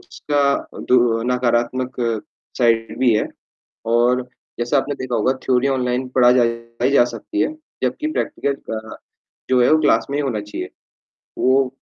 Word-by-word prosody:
उसका 145 -1 -2 0.5
दुरर 120 -2 +3
नकारात्मक 125 +1 0 0.6
साइड 115 -2 +2
भी 125 -3 +4
है 105 - +1 0.7
और 125 +2 +3 0.4
जैसा 120 +4 +1
आपने 145 +1 -1
देखा 130 -3 -3
होगा 115 +4 +2
थ्योरी 130 +1 +2
ऑनलाइन 130 -1 0
पढ़ाई 120 -1 +2
जा 140 -3 +6
सकती 320 - -4
है, 310 - 0 0.3
जबकि 310 - -1
प्रैक्टिकल 140 - -1 0.2
अ, 110 0 -7 0.6
जो 125 -1 +4
है - - +4
वो 155 - +6
क्लास 150 - +3
में 140 - -1
ही - - +1
होना 125 -7 -2
चाहिए। 105 0 -6 0.7
वो, 130 +1 +3
125 Hz, 145 wpm, -20 LUFS, 120-130 Hz, 0.7 s, जा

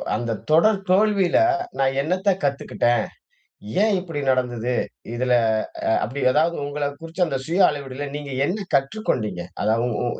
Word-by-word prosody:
அந்த 115 +1 -2 0.2
தொடர் 195 +6 +5
தோல்வியில 195 -2 +3 0.4
நான் 135 0 +1
என்னத்தை 185 +6 +1
கத்துக்கிட்டேன்? 135 -3 +1 0.8
ஏன் 215 -1 +3
இப்படி 165 -5 -5
நடந்தது? 125 -2 0 0.4
இதுல 125 +1 +1 0.5
அ - - +3
அப்படி 130 +6 -5
ஏதாவது 165 +4 +2
உங்கள 145 0 -2
குறிச்சு 165 +2 -4
அந்த 140 - -2
சுய 170 +4 0
அளவீடுல 140 0 -4
நீங்க 145 -1 -7 0.2
என்ன 200 +2 -2
கற்றுக்கொண்டீங்க. 130 - 0 0.2
அதாவது 115 +2 +1 0.2
உ - - -1
145 Hz, 135 wpm, -23 LUFS, 125-180 Hz, 0.8 s, தொடர்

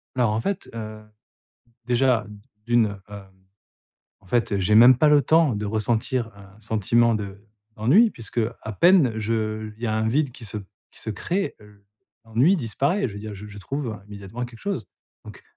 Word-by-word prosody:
Alors 120 -4 +2
en 110 - -1
fait, 195 +6 -3
heu, 110 -1 -7 0.8
déjà 125 -3 +2 0.4
d'1, 110 -4 +2
hem, 100 -2 -11 0.9
en 95 - -23
fait, 110 -1 0
j'ai 95 +3 +2
même 120 +3 +8
pas 150 +3 +4
le 145 -1 +5
temps 160 -6 +3
de 105 0 -3
ressentir 115 +2 -1
un 100 +1 -16
sentiment 115 +2 +2
de 100 -1 -5 0.3
d'ennui! 175 - +5
Puisque 115 +1 -4 0.2
à 110 - -5
peine 165 - +5
je 110 0 -2
il 115 - -17
y - - 0
a 110 - 0
un 110 0 0
vide 140 +2 +1
qui 120 - -11
se 105 +1 -5 0.3
qui - - -15
se 110 - -5
crée, 180 - -2
heu, 105 -1 -19 0.4
l'ennui 125 - +3
disparaît. 140 - 0
Je 100 - -10
veux - - -7
dire 105 0 -7
je 105 +2 -9
je 105 0 -11
trouve 120 0 -4
immédiatement 105 +4 -7
quelque 120 -2 -11
chose. 135 - -3 0.4
Donc, - - -12
110 Hz, 180 wpm, -24 LUFS, 105-125 Hz, 0.9 s, même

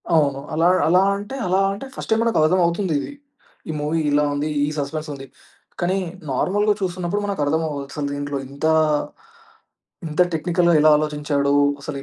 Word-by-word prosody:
ఓహో! 145 -4 +2
అలా, 165 +2 +3 0.2
అలా 180 +3 +4
అంటే 205 +6 -6
అలా 185 +1 +2
అంటే, 200 +7 -6
ఫస్ట్ - - -7
టైమ్ 220 +1 +3
మనకు 230 -1 +1
అర్థం 165 +4 +3
అవుతుందిది. 170 - -1 0.6
ఈ - - 0
మూవీ 155 +2 0
ఇలా 145 +1 +3
ఉంది 145 +2 -2 0.2
ఈ - - -3
సస్పెన్స్ 150 +2 -4
ఉంది. 135 -1 -9 0.6
కానీ, 180 +2 +1 0.3
నార్మల్‌గా 205 +10 +1
చూస్తున్నప్పుడు 185 +1 -2
మనకు 200 -6 -2
అర్థం 160 +3 +1
అవ్వదు 140 -2 -4
అసలు 145 -2 -3
దీంట్లో 145 0 -3
ఇంతా, 140 +4 -1 1.4
ఇంత 155 +3 0
టెక్నికల్‌గా 175 +2 +2
ఎలా 155 0 +6
ఆలోచించాడు, 150 -2 0 0.3
అసలు 140 - -5
155 Hz, 160 wpm, -21 LUFS, 145-185 Hz, 1.4 s, ఎలా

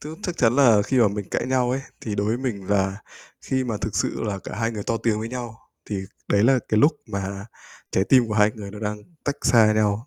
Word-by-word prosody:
t - - -8 0.2
chắc 180 -1 -3
chắn 120 -1 +3
là 115 -7 +6
khi 130 +4 0
mà 115 -4 +5
mình 100 -1 -5
cãi - - -1
nhau 125 -1 +1
ấy, 135 +2 -1 0.2
thì 105 -3 -4
đối 100 +1 -1
với 110 - +1
mình 115 -7 -4
là 95 -1 +1 0.5
khi 130 -1 -1
mà 115 -3 -2
thực - - -3
sự - - -1
là 100 -3 -2
cả - - -8
hai 115 +1 0
người 105 -3 -5
to 115 +2 -1
tiếng 110 -2 0
với 110 +1 -4
nhau, 120 -3 -6 0.3
thì 100 -2 -1 0.3
đấy 100 0 +3
là 130 +1 +5
cái 110 0 +3
lúc 150 +2 +5
mà 100 0 -5 0.4
trái 95 - +2
tim 125 0 +4
của 105 - -2
hai 105 0 +4
người 100 -2 -8
nó 105 - -9
đang 105 0 -3 0.3
tách 145 0 -1
xa 110 -3 +5
nhau, 110 +3 +1
110 Hz, 255 wpm, -23 LUFS, 105-125 Hz, 0.5 s, là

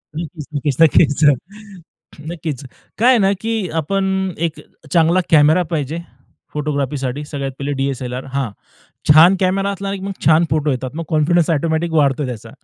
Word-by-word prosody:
नक्कीच, 160 -2 -6
नक्कीच, 145 -1 -2
नक्कीच, 155 -1 +4
अ, 145 - +7 1.0
नक्कीच. 155 -5 -5 0.3
काय 240 +4 +4
आहे 255 - +6
ना, 195 0 +3
की 225 -5 -2
आपण 195 +5 -1 0.4
एक 160 - -10 0.3
चांगला 170 +2 +3
कॅमेरा 155 +3 +5
पाहिजे 155 +2 -2 0.5
फोटोग्राफीसाठी. 145 -2 -2
सगळ्यात 140 -2 -4
पहिले 140 +1 -3
डी-एस-एल-आर, 130 -2 -3
हां, 135 -5 -1 0.6
छान 170 +5 +7
कॅमेरा 195 +1 +1
असला, 195 0 -4
की 195 - -6
मग 195 0 -4
छान 160 +2 +5
फोटो 150 0 +1
येतात. 130 0 -3
मग 165 - -4
कॉन्फिडन्स 160 +1 +2
ऑटोमॅटिक 160 +1 0
वाढतो 145 -2 +2
त्याचा. 120 -4 -7
155 Hz, 150 wpm, -18 LUFS, 140-175 Hz, 1.0 s, अ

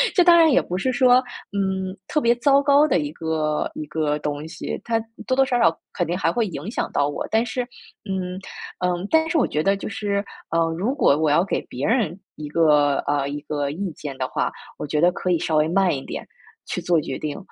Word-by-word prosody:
这 360 - +6
当 345 -1 +7
然 325 -2 +6
也 265 - +4
不 180 - -4
是 255 +7 0
说， 245 0 +5 0.4
嗯， 190 -1 -1
特 300 - 0
别 235 -1 +4
糟 275 +3 +4
糕 285 +2 +5
的 260 - +2
一 145 -1 -3
个 160 -2 -1
一 155 - -5
个 150 -1 -1
东 150 +1 -4
西， 160 -1 -5
它 230 -1 +1 0.3
多 255 - +2
多 270 - +5
少 255 -2 0
少 165 -8 +4 0.2
肯 - - -1
定 175 +2 -1
还 - - +1
会 235 -2 0
影 165 +1 -6
响 - - -2
到 145 - +1
我， 145 - -4
但 225 +1 +3
是， 250 +1 -2 0.4
嗯， 185 -1 -3 0.5
嗯， 180 0 -1
但 320 0 +4
是 325 - +1
我 - - +2
觉 155 - -1
得 195 +3 +3
就 195 - -6
是， 200 -1 -2 0.3
嗯， 165 - +4 0.2
如 215 +9 0
果 145 - +4
我 155 0 +2
要 165 +4 +4
给 195 - -1
别 130 +3 -5
人 215 -8 +1 0.2
一 150 - -7
个， 150 -3 +3
呃， 145 -1 +1
一 145 +1 -5
个 145 -1 -2
意 185 +4 -4
见 140 -2 -7
的 - - -2
话， - - -1 0.3
我 - - -4
觉 150 +1 0
得 175 - +5
可 180 +1 -2
以 170 - +2
稍 160 - -1
微 155 0 +3
慢 185 +2 +2
一 135 - -6
点 - - -6 0.4
去 - - -3
做 170 -2 +2
决 135 - -5
定。 150 -2 -4
180 Hz, 255 characters per minute, -23 LUFS, 150-230 Hz, 0.5 s, 当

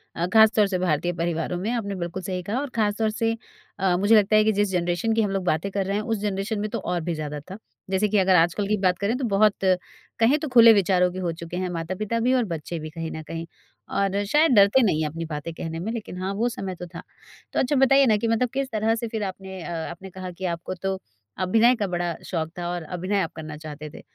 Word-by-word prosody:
अ, 170 - 0
ख़ास 220 0 +7
तौर 210 -2 +4
से 185 -2 -1
भारतीय 175 0 0
परिवारों 170 +1 -2
में 200 +5 -3
आपने 200 -5 -2
बिल्कुल 175 +1 -4
सही 185 -1 -3
कहा 220 +7 -2
और 285 -1 -4
ख़ास 210 -2 +1
तौर 220 -1 +1
से 225 +1 0 0.5
अ, 185 -2 +2
मुझे 205 +4 +4
लगता 215 0 +4
है 215 - +6
कि 220 - +3
जिस 205 -1 +2
जनरेशन 175 +5 0
की 225 - +2
हम 205 -2 0
लोग 195 -1 -1
बातें 160 +4 0
कर 195 -1 -1
रहे 200 +1 -1
हैं, 210 - -2
उस 225 -1 -1
जनरेशन 205 +1 -2
में 210 0 -2
तो - - -3
और 175 -1 -2
भी 170 +1 -2
ज़्यादा 150 -1 -4
था। 195 - -6 0.3
जैसे 195 +2 +2
कि 210 - +2
अगर 190 -1 +4
आजकल 175 +4 +2
की 210 0 +1
बात 185 -2 +2
करें 205 +4 0
तो 270 - -4
बहुत 210 0 +5 0.7
कहें 245 +7 +4
तो 310 - -4
खुले 230 -1 +9
विचारों 180 -2 +3
के 185 - -6
हो 170 - 0
चुके 170 +1 -7
हैं 185 -1 -2
माता-पिता 185 +7 -3
भी 250 +3 +2
और 250 -2 +3
बच्चे 165 -1 -5
भी 155 0 -6
कहीं 165 0 -5
न 160 - -6
कहीं। 165 +1 -6 0.5
और 200 +1 +1
शायद 300 +7 +3
डरते 200 +6 +6
नहीं 160 -7 +2
हैं 150 - 0
अपनी 165 +2 -5
बातें 155 +1 -5
कहने 165 0 -5
में, 215 +6 -3
लेकिन 220 -6 -6
हाँ, 195 +1 -2
वो 235 +4 0
समय 195 -5 -5
तो 180 - -7
था। - - -6 0.5
तो - - +1
अच्छा 270 +3 +1
बताइए 270 +1 +5
ना 215 -3 +4
कि 230 +2 -1
मतलब 230 +2 +1
किस 270 0 -1
तरह 220 +1 +1
से 230 0 -4
फिर 220 -1 -3
आपने 190 -1 -6
अ, 175 - -6 0.2
आपने 190 +3 -10
कहा 185 0 -7
कि 185 +2 -7
आपको 170 +2 -6
तो 190 +1 -3 0.4
अभिनय 225 +7 +4
का 205 -4 -2
बड़ा 175 -1 -2
शौक़ 160 -3 -2
था 175 0 -3
और 175 -1 -3
अभिनय 185 +4 -2
आप 165 - -2
करना 155 -1 -7
चाहते 155 -1 -8
थे, - - -12
190 Hz, 260 wpm, -24 LUFS, 175-215 Hz, 0.7 s, खुले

